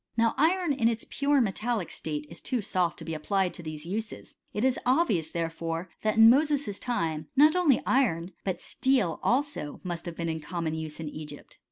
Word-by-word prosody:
Now 230 0 +3
iron 340 +1 +2
in 245 -4 +2
its 230 -1 -1
pure 285 0 +2
metallic 220 -2 -1
state 150 -1 -4
is 170 +2 -11
too 250 - -1
soft 180 -4 0
to - - -9
be 165 - -4
applied 185 +4 0
to - - -7
these 155 -1 -6
uses 210 +5 -5
t - - -30 0.2
it 210 - 0
is 260 -1 +2
obvious, 245 - +2
therefore, 165 +1 -3
that 215 0 0
in 225 0 +9
Moses's 280 -4 +3
time, 160 -10 -2
not 300 +4 +6
only 335 -8 +3
iron 185 -10 +1
but 190 -2 -2
steel 250 - +1
also 255 - -1
must 175 -1 -5
have 170 - -5
been 170 0 -3
in 160 -1 -2
common 165 0 -3
use 160 -1 -5
in 160 - -4
Egypt. 150 -1 -9
190 Hz, 200 wpm, -28 LUFS, 165-255 Hz, 0.2 s, in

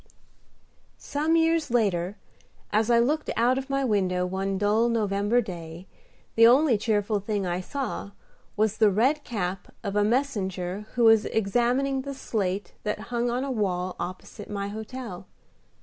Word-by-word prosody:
III - - -33 0.9
Some 310 +3 0
years 325 -2 +2
later, 200 -5 0 0.6
as 215 +2 +2
I 235 - +5
looked 295 +7 +1
out 245 +3 +3
of 270 +1 -8
my 275 0 0
window 185 -5 +1
one 190 +1 -2
dull 210 +4 +2
November 210 +1 +1
day, 175 -4 -8 0.5
the 230 0 +7
only 260 +1 +5
cheerful 210 -1 0
thing 205 -1 -2
I 175 0 -1
saw 260 -1 -4 0.5
was 215 0 +1
the 215 -2 +5
red 255 +10 +2
cap 190 -4 -4
of 200 -2 -3
a 210 - +3
messenger 205 -6 -1
who 240 - +2
was 225 -1 +6
examining 245 +6 +1
the 275 +1 -6
slate 200 -6 -2
that 210 0 -2
hung 240 0 +1
on 245 +2 -1
a 275 - -3
wall 185 -5 -1
opposite 185 +4 -7
my 200 -1 -3
hotel. 220 -3 -7
215 Hz, 155 wpm, -26 LUFS, 195-245 Hz, 0.9 s, the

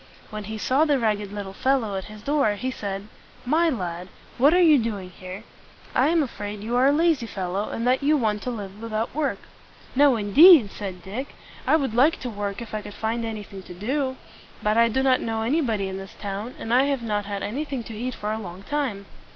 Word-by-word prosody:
When 215 -1 -5
he 220 +2 -5
saw 260 +7 +2
the 295 -3 +3
ragged 210 -4 0
little 200 -2 -6
fellow 235 -3 +1
at 190 - -4
his 215 0 -11
door, 280 -7 +2
he 255 +5 -3
said, 200 -4 -5 0.4
"My 325 +6 +3
lad, 180 - -4 0.3
what 280 +4 +6
are 355 - +4
you 315 -5 +6
doing 205 -5 -3
here? 185 +3 -9 0.5
I 260 - +3
am 330 0 +3
afraid 210 -5 -6
you 235 +3 -2
are 255 +2 +5
a - - +5
lazy 310 -5 +2
fellow, 195 0 -3
and 230 - -3
that 255 +1 +3
you 300 +2 +3
want 215 -5 0
to - - -3
live 205 -3 -6
without 225 0 -3
work." 295 -1 -1 0.6
"No, 280 -1 +5
indeed!" 235 - +7
said 185 -4 -7
Dick. 240 +9 -6 0.3
"I - - +5
would 275 -7 0
like 280 +8 +4
to 245 - -4
work, 205 +1 -4
if 225 - -12
I 215 - -2
could 205 -1 -10
find 225 +1 -2
anything 210 -3 -6
to 180 - -11
do. 260 +7 -1 0.5
But 210 +1 +2
I 230 0 +5
do 265 +4 0
not 260 -1 +3
know 225 -1 -2
anybody 230 -6 0
in 190 0 -5
this 195 0 -10
town, 205 +4 -5
and 225 - -3
I 260 +2 +5
have 275 -4 -1
not 210 -2 -1
had 200 -1 -4
anything 265 +4 -3
to 225 - -9
eat 245 +3 -4
for 210 0 -3
a 220 - -2
long 185 -1 -9
time." 255 -7 -2
225 Hz, 225 wpm, -24 LUFS, 205-265 Hz, 0.6 s, indeed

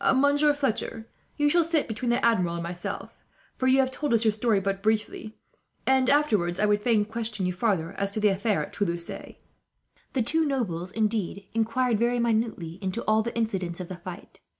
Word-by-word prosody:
"Monsieur 285 +2 +4
Fletcher, 230 -5 -2 0.3
you 295 -1 +3
shall 340 +3 +4
sit 325 -2 0
between 225 +2 -3
the 240 +1 +2
Admiral 180 -7 +2
and 170 - -4
myself; 175 +1 -5 0.4
for 260 - -1
you 260 +1 +5
have 260 -1 +2
told 285 -2 0
us 230 0 +2
your 220 - +5
story 215 -1 +1
but 195 0 -2
briefly, 215 0 -1 0.5
and 265 -1 +3
afterwards 210 -12 +2
I 210 - +3
would 205 0 +2
fain 215 -2 +2
question 220 -2 -3
you 180 - 0
farther, 180 -4 0
as 200 0 +1
to 215 - 0
that 210 -1 +4
affair 205 0 0
at - - -16
Toulouse." 170 -4 -1 1.1
The 260 - +1
two 320 +7 +4
nobles, 195 - -2
indeed, 210 -3 -1
inquired 230 +1 +1
very 240 +1 +2
minutely 220 -7 -1
into 190 +4 -3
all 215 0 +3
the 235 +2 -4
incidents 190 -6 -2
of 180 - -6
the 185 - -5
fight. 180 +2 -10
220 Hz, 195 wpm, -26 LUFS, 195-245 Hz, 1.1 s, you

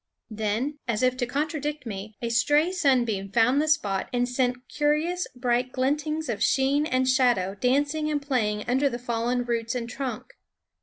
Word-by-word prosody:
Then, 220 +7 -2
as 230 0 0
if 255 0 +3
to 245 -2 -1
contradict 295 +1 -3
me, 210 -1 -7
a 235 - -1
stray 295 +8 +3
sunbeam 240 - +1
found 240 +6 +3
the 310 - -1
spot 205 -11 0
and 245 0 +1
sent 250 0 -1
curious 305 +5 0
bright 250 0 0
glintings 300 +4 -1
of 225 -4 -3
sheen 280 +3 +2
and 255 -1 +1
shadow 245 -8 +2
dan 260 +5 +3
cing 305 +1 -3
and 295 - +1
playing 225 -7 -1
under 265 +3 +2
the 240 - -4
fallen 245 0 -1
roots 230 0 -2
and 235 -2 -3
trunk. 260 - -5
255 Hz, 170 wpm, -26 LUFS, 235-290 Hz, -, if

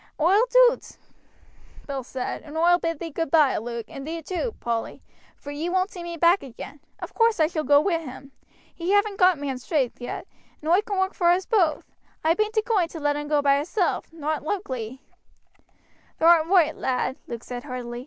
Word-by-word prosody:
"Oi'll 390 +10 +4
do't," - - +3 0.9
Bill 275 -2 -4
said, 255 +1 -5
"and 305 +1 -9
oi'll 350 +2 +4
bid 330 -2 -2
thee 330 +2 -6
goodby, 310 -2 +2
Luke, 235 0 -5
and 275 +1 -9
thee 330 0 -5
too, 380 +8 -3
Polly, 230 -1 -3 0.3
for 285 - -9
ye 305 +4 -3
won't 370 +2 0
see 355 - -8
me 345 0 -6
back 340 +4 +4
agin. 270 +3 -10 0.2
Of - - -8
course 455 -4 +2
I 315 - +5
shall 310 -1 -2
go 285 -1 +5
wi' 335 +1 +1
him. 275 -2 -10 0.4
He 350 +3 -2
haven't 410 0 +2
got 365 -2 +5
man's 270 -3 -4
strength 265 -7 -1
yet, 245 - -5 0.3
and 310 +2 -2
oi 365 +4 +5
can 410 -2 -4
work 380 +1 0
for 345 - 0
us 360 +1 +2
both. 355 -9 +1 0.4
I 320 +1 +4
bain't 430 +3 -1
a 435 - +3
going 405 -7 +2
to 330 - -9
let 290 -1 0
him 295 0 -4
go 295 -1 +1
by 280 0 +4
hisself, 350 +5 -1
not 310 -1 -3
loikely." 265 - -4 1.2
"Thou 320 - 0
art 330 -2 +6
roight, 335 -4 +3
lad," 260 0 -1
Luke 235 -1 -6
said 245 +2 -7
heartily. 245 -3 -6
320 Hz, 200 wpm, -24 LUFS, 280-365 Hz, 1.2 s, art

